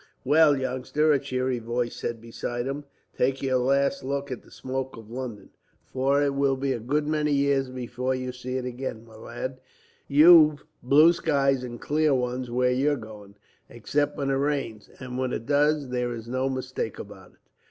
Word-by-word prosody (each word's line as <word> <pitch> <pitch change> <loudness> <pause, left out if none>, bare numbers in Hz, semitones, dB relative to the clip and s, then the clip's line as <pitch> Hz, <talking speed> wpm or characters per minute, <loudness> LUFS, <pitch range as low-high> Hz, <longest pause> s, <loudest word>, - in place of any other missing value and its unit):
"Well, 150 +1 +5
youngster," 130 +4 +1
a 140 - +2
cheery 130 -1 -2
voice 120 +1 -2
said 115 -1 -4
beside 120 +1 -5
him, 140 +2 -4 0.3
"take 135 +2 0
your 130 -1 +2
last 140 +6 +1
look 140 +1 -3
at 125 - -5
the - - -20
smoke 130 -1 -5
of 110 -1 -12
London, 120 -4 -7 0.3
for 135 +2 +1
it 140 -1 +1
will 140 -1 +2
be 135 0 -1
a - - -4
good 145 +7 -1
many 150 -1 0
years 140 -2 +2
before 125 +1 -3
you 130 0 -4
see 125 +1 -5
it 130 - -4
again, 125 -2 -5
my 110 -1 -16
lad. 130 +4 -6 0.5
You've 155 0 +7 0.2
blue 150 +7 +6
skies 140 -5 +1
and 120 -2 -7
clear 150 -1 +1
ones 125 0 -2
where 125 +1 +1
you're 140 +4 +2
going, 105 -3 -11 0.3
except 145 +5 -1
when 140 -2 -1
it 135 - +1
rains, 135 -6 -2
and 130 -1 -6
when 130 -1 -1
it 115 - -4
does 145 0 +2
there 125 -1 -2
is 115 0 -9
no 130 +2 -1
mistake 130 -4 -4
about - - -11
it." - - -31
130 Hz, 185 wpm, -26 LUFS, 125-140 Hz, 0.5 s, You've